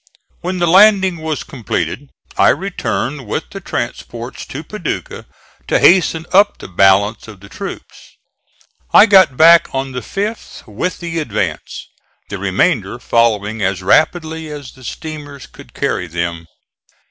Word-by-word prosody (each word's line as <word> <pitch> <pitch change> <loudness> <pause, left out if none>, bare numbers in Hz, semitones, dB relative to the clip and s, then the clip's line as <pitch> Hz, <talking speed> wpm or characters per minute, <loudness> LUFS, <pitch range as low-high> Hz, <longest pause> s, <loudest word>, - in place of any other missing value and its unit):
When 185 +1 -3
the 175 - +1
landing 190 0 +5
was 155 -1 -4
completed 120 - -4 0.3
I - - +4
returned 150 - -2
with 130 - -4
the 195 - -8
transports 120 -4 -6
to 145 +4 -7
Paducah 180 -1 -6 0.4
to - - +2
hasten 170 -3 +4
up 200 +2 +4
the - - -10
balance 95 +4 +2
of 105 -4 -12
the 100 +1 -15
troops. - - -9 0.7
I - - +8
got 190 - +5
back 170 +1 +7
on 135 0 -2
the 125 - -4
5th 205 - -5
with 125 - -4
the 165 -1 -3
advance, 110 -9 -4 0.4
the - - -5
remainder - - 0
following 110 -2 0
as 95 -1 -1
rapidly 160 - +1
as 145 -4 -8
the 130 - -17
steamers 145 -1 -8
could - - -16
carry 90 - -2
them. 85 0 -4
145 Hz, 140 wpm, -16 LUFS, 110-175 Hz, 0.7 s, I